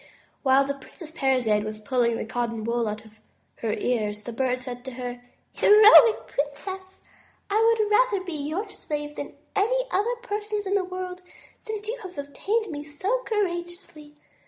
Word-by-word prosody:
While 270 0 +4
the 280 - -1
Princess 305 +3 -12
Parizade 255 -9 +2
was 215 0 -5
pulling 235 +1 +1
the - - -4
cotton 230 -1 -3
wool 235 0 0
out 215 +1 -5
of 215 0 -19 0.4
her 225 - -2
ears, 210 -4 -1
the 240 - -6
Bird 255 +1 -1
said 245 -1 -7
to 260 - -6
her: 245 0 -6 0.3
"Heroic 430 +2 +7
princess, 375 +7 -5 0.5
I 425 +2 +3 0.2
would 430 -1 +2
rather 420 -4 +3
be 350 - -4
your 310 +8 -3
slave 295 -1 -5
than - - -6 0.2
any - - +2
other 445 +6 +1
person's 420 -2 -3
in 390 - -1
the 400 -2 +2
world 365 0 -6 0.4
since 430 -1 -6
you - - -3
have 370 -5 -9
obtained 390 +9 -2
me 290 -1 -5
so 375 +12 -1
courageously. 345 -6 -3
300 Hz, 165 wpm, -25 LUFS, 245-405 Hz, 0.5 s, Heroic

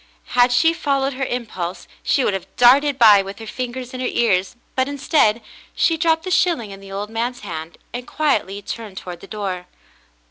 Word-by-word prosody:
Had 245 0 +5
she 325 +7 +4
followed 275 -4 0
her 265 +1 -2
impulse, 210 -9 -4
she 275 - +2
would 205 - +1
have 195 - -4
darted 270 +3 +5
by 215 -5 +8
with 195 +1 -8
her 225 - -9
fingers 250 +2 -5
in 255 - -5
her 255 - -1
ears, 195 -3 +1 0.2
but 260 0 +1
instead, 275 -5 +2 0.3
she 330 - +3
dropped 325 -1 +2
the 370 - -4
shilling 330 - +2
in 195 - -9
the 195 0 -12
old 205 +2 -5
man's 240 +2 -2
hand, 165 -3 -7 0.2
and 245 +1 -6
quietly 205 -10 0
turned 215 -3 -7
toward 180 -2 -7
the 195 - -12
door. 190 -4 -4
240 Hz, 190 wpm, -21 LUFS, 195-270 Hz, 0.3 s, by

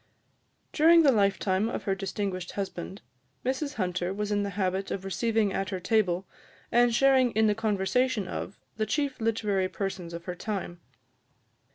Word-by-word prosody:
During 330 +2 +6
the 280 - +6
lifetime 200 -1 +1
of - - -4
her 195 - 0
distinguished 195 -1 -4
husband, 195 -1 -5 0.4
Mrs 280 +3 -1
Hunter 180 -2 -1
was 210 +1 -3
in 205 0 +1
the 200 - -2
habit 190 0 -1
of 195 -1 -4
receiving 215 0 +1
at 195 -1 -2
her 190 -2 -3
table, 190 -2 +1 0.5
and 240 0 +4
sharing 260 +1 +4
in 220 0 +3
the 210 - +4
conversation 220 +1 0
of, 195 - -6 0.2
the 215 -1 0
chief 280 +2 -1
literary 210 -4 0
persons 185 -4 -4
of 170 0 -8
her 180 - -3
time. 180 -2 -5
205 Hz, 160 wpm, -28 LUFS, 190-225 Hz, 0.5 s, During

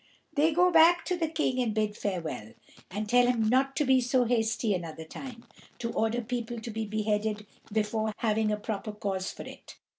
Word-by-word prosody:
They 310 +3 +3
go 360 +3 +4
back 335 +1 +6
to 365 - 0
the 335 -2 0
King 305 -5 0
and 225 -3 -1
bid 215 -1 0
farewell, 165 - -4 0.4
and 210 +4 -4
tell 245 +2 +5
him 230 -3 +2
not 270 +2 +2
to 295 - +1
be 260 -1 +4
so 250 +1 +2
hasty 225 -2 +1
another 165 -3 -5
time 235 +8 -9 0.3
to 230 -1 -3
order 225 +2 0
people 240 0 -4
to 230 +1 -6
be 220 0 -3
beheaded 210 0 -1 0.3
before 215 0 0
having 220 -1 +1
a 210 - 0
proper 210 0 -4
cause 195 -2 -3
for - - -9
it. - - -11
225 Hz, 190 wpm, -29 LUFS, 210-250 Hz, 0.4 s, back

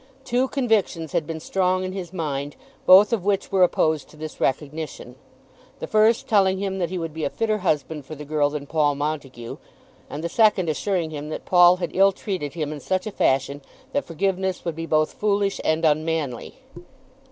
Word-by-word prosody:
Two 255 0 +1
convictions 220 - 0
had 155 - -1
been 165 -1 -4
strong 185 +2 0
in 185 - -3
his 185 -3 -6
mind, 145 -5 -4 0.3
both 195 +4 +8
of 215 -6 0
which 200 0 0
were 190 -1 +2
opposed 155 -4 +2
to 155 - -17
this 155 0 -8
recognition, 145 -1 -3 0.6
the - - -5
first 215 +2 +3
telling 195 -3 +3
him 195 0 -3
that 175 -2 -1
he 185 - -4
would 165 -3 -4
be 160 0 -5
a - - 0
fitter 215 +3 -1
husband 150 -4 -1
for 155 - -9
the 150 0 -9
girl 145 -1 +1
than 145 -1 -5
Paul 145 -1 +1
Montague, 140 -5 -4 0.5
and 150 +2 -6
the - - 0
second 200 -3 +3
assuring 170 0 -1
him 150 0 -6
that - - -6
Paul 175 -1 +6
had 175 -2 -4
ill 195 +1 +5
treated 180 -7 -4
him 155 -3 -3
in 150 - -7
such 185 - -2
a 215 - -4
fashion 140 -4 0 0.3
that 285 - 0
forgiveness 190 +2 -2
would 170 -2 -2
be 165 +1 -5
both 155 -1 +1
foolish 200 -1 0
and 160 +1 +1
unmanly. 155 -4 -1
165 Hz, 195 wpm, -23 LUFS, 150-195 Hz, 0.6 s, both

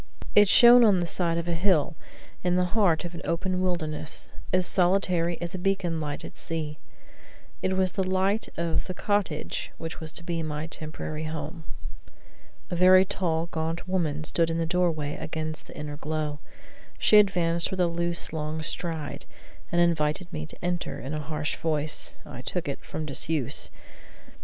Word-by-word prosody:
It 205 0 +7
shone 240 +3 +9
on 205 -5 +5
the 175 - 0
side 170 -1 0
of 170 0 -2
a 170 - +1
hill 170 -3 +2 0.5
in 180 0 +2
the 180 0 +3
heart 185 -7 +3
of 175 - -6
an 170 - -7
open 185 +2 -1
wilderness 155 -4 -2 0.2
as 185 0 +3
solitary 175 -2 +2
as 175 +1 -4
a 185 - -4
beacon 180 -3 0
light 145 -1 -4
at - - -10
sea. 155 -2 -4 0.8
It 190 0 0
was 185 -1 +2
the 190 -2 -1
light 190 +3 +1
of 170 0 -1
the 185 - -4
cottage 205 -8 -1
which 165 0 -6
was 160 -1 -6
to 170 - -2
be 170 -1 -2
my 155 -1 -3
temporary 155 -1 -5
home. 160 +1 -5 1.1
A - - 0
very 185 +1 +7
tall, 165 -4 0
gaunt 165 +3 -2
woman 160 -5 0
stood 165 +2 +3
in 165 - -1
the 165 - +1
doorway 165 -4 0
against 155 -1 -4
the - - -11
inner 150 -1 -5
glow. 150 -1 -3 0.6
She 210 - +6
advanced 170 -4 +2
with 190 - -4
a 180 - +5
loose, 170 0 -1
long 155 0 -3
stride, 160 -3 -4 0.5
and 175 - +2
invited 170 0 +1
me 75 0 -4
to - - -9
enter 175 -6 -2
in 135 +3 -5
a 155 - -1
voice 155 0 -2
harsh - - -26
(I - - -8
took - - -3
it) - - -4
from 155 - -5
disuse. 145 -1 -1
170 Hz, 175 wpm, -27 LUFS, 155-180 Hz, 1.1 s, shone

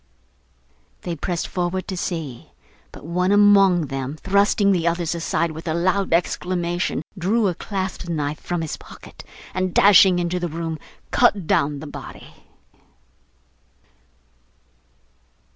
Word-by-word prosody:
They 175 - -4
pressed 170 +2 -3
forward 180 +1 -2
to 190 - -4
see; 160 -8 -5 0.4
but - - -12
one 180 +3 0
among 200 -4 +5
them 135 +1 -5
thrusting 200 +2 +2
the 175 -3 +1
others 170 -1 0
aside 170 0 -1
with 160 +2 -9
a 160 - 0
loud 185 +3 0
exclamation, 175 -1 -1
drew 205 +4 +1
a 180 - 0
clasp 190 -1 -5
knife 150 -2 -2
from 175 -1 -3
his 155 - -4
pocket, - - -13 0.3
and 185 -1 -2
dashing 195 -2 +7
into 175 +1 -1
the 175 -1 -3
room, 165 0 -4 0.3
cut 210 -7 +3
down 145 -1 +1
the - - -7
body. 145 - -10
175 Hz, 125 wpm, -22 LUFS, 165-190 Hz, 0.4 s, dashing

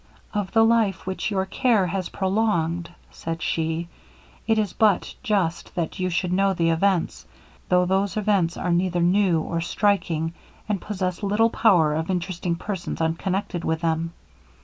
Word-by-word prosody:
'Of 205 -4 -2
the 225 0 +6
life 220 -6 +2
which 190 +3 -2
your 190 -2 0
care 215 0 +2
has 185 0 -3
prolonged,' 185 -4 0 0.2
said 165 0 -5
she, 165 +1 -1 0.6
'it 225 -1 +3
is 210 -4 0
but 210 -4 +2
just 195 -8 -1
that 170 +2 -3
you 185 0 0
should 180 +1 -1
know 195 +1 +3
the 165 -1 +2
events; 180 +1 0 0.4
though 180 0 +4
those 195 +3 0
events 195 -5 +1
are 180 - -1
neither 175 0 +1
new, 180 -1 +3
or 165 +1 -2
striking, 170 -4 0 0.3
and 205 -4 -1
possess 185 -4 -3
little 210 +3 +2
power 170 -11 +4
of 160 +3 -2
interesting 180 -1 -2
persons 185 0 -5
unconnected 175 +2 -1
with 160 0 -1
them. 165 0 -1
185 Hz, 155 wpm, -24 LUFS, 170-200 Hz, 0.6 s, the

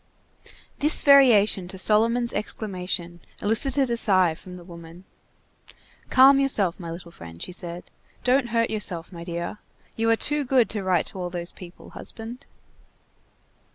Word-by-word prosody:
This 300 +2 +5
variation 230 -9 +5
to 190 +1 -7
Solomon's 230 +5 +2
exclamation 180 -5 -4 0.2
elicited 260 +5 0
a 235 - 0
sigh 185 -6 +3
from 180 +3 -12
the 180 - -11
woman. 170 0 -12 1.1
"Calm 270 +1 +6
yourself, 205 -11 +1
my 170 -2 -7
little 170 +1 -9
friend," 85 - -12
she - - -7
said. 175 -1 -6 0.4
"Don't 255 0 +2
hurt 230 0 0
yourself, 180 -6 -4
my 170 -1 -8
dear. 170 +4 -5 0.4
You 225 0 0
are 225 - +5
too 295 +5 0
good 255 -3 +2
to 210 - -2
write 185 -1 +1
to 190 - -10
all 180 -1 -3
those 175 -1 -5
people, 180 -1 -13
husband." 230 +3 -8
200 Hz, 150 wpm, -24 LUFS, 175-235 Hz, 1.1 s, Calm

